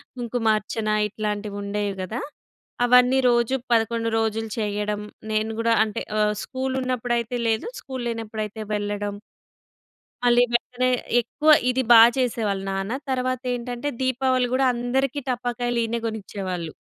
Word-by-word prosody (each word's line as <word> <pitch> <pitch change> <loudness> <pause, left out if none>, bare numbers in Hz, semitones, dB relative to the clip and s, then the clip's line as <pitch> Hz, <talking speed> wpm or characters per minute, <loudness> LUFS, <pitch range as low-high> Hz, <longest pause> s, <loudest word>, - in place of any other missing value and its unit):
కుంకుమార్చన 225 -2 -1 0.2
ఇట్లాంటివి 210 -1 -4
ఉండేవి 200 -1 -2
గదా! 225 +7 -4 0.6
అవన్నీ 250 +1 +5
రోజు 240 +2 +2 0.2
11 230 0 +2
రోజులు 225 0 -1
చేయడం. 210 0 -2 0.3
నేను 215 +1 0
గూడా 230 0 +3
అంటే 210 - -4 0.2
ఆహ్, 210 0 +3
స్కూలున్నప్పుడైతే 255 -3 -2
లేదు, 220 - 0
స్కూల్లేనప్పుడైతే 225 -4 -4
వెళ్ళడం. 205 0 -2 1.1
మళ్ళీ 245 0 +5
వెంటనే 250 +1 +1 0.3
ఎక్కువ 300 +6 -1 0.2
ఇది 255 +1 +1
బాగా 230 0 +10
చేసేవాళ్ళు 220 -6 0
నాన్న. 195 +2 -3 0.2
తర్వాతేంటంటే, 250 0 -2
దీపావళి 260 0 +1
గూడా 265 +1 +3
అందరికి 250 +3 -1
టపాకాయలు 245 -1 -1
ఈయనే 230 +1 -2
గొనిచ్చేవాళ్ళు. 190 -6 -5
230 Hz, 110 wpm, -24 LUFS, 210-250 Hz, 1.1 s, బాగా